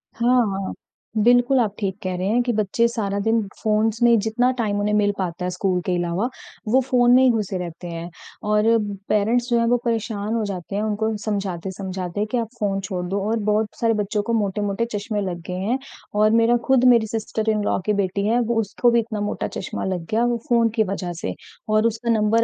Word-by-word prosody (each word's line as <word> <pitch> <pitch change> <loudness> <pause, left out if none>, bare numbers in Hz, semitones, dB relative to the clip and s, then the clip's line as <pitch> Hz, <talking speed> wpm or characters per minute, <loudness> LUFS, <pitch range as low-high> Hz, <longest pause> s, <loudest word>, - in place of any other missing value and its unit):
हाँ, 245 +2 +3 0.2
हाँ। - - -4 0.5
बिल्कुल 245 +3 +4
आप 215 -4 +1
ठीक 195 -2 -2
कह 185 -1 -2
रहे 185 +1 -2
हैं 230 +4 +2
कि 240 - 0
बच्चे 215 +2 +2
सारा 205 -4 -2
दिन 225 0 +3 0.2
फ़ोन्स 220 +1 +1
में 235 -1 +6
जितना 225 +4 +1
टाइम 210 -4 0
उन्हें 210 +1 0
मिल 205 -1 +3
पाता 180 -1 -3
है 180 - -1
स्कूल 180 0 0
के 180 - 0
अलावा 175 +6 -1 0.4
वो 260 - +6
फ़ोन 245 -1 +3
में 255 - +6
ही 260 - +6
घुसे 210 -4 -1
रहते 175 0 -6
हैं। 170 0 -6 0.4
और 210 0 +3 0.5
पेरेंट्स 230 +4 +2
जो 235 - +3
हैं 230 - +2
वो 245 +1 +3
परेशान 220 -2 -1
हो 230 -1 0
जाते 195 -1 -5
हैं, 205 - 0
उनको 220 +1 -1
समझाते-समझाते 190 -1 -3
कि 250 - +1
आप 230 - -1
फ़ोन 195 -2 0
छोड़ 185 -2 -4
दो 200 +2 -1
और 225 0 +1
बहुत 215 +1 +2
सारे 230 -1 +3
बच्चों 210 +1 -1
को - - +2
मोटे-मोटे 205 0 0
चश्मे 205 0 -2
लग 180 -3 -4
गए 180 - -4
हैं। 220 +7 0 0.4
और 215 0 +5
मेरा 230 +1 +4
खुद 265 -2 +4
मेरी 225 -2 +2
सिस्टर-इन-लॉ 215 -1 -1
की 210 - +2
बेटी 200 0 -1
है 235 +3 +3
वो 235 0 0
उसको 220 +4 +1
भी 235 - +4
इतना 220 -2 -3
मोटा 205 - -2
चश्मा 190 - -5
लग 185 -3 -2
गया 225 +2 +2
वो 240 -1 +1
फ़ोन 235 -1 +4
की 220 - +3
वजह 180 -3 -3
से। - - -3 0.3
और 215 +1 +3
उसका 230 +1 -3
नंबर 220 +1 +3
215 Hz, 215 wpm, -22 LUFS, 195-230 Hz, 0.5 s, में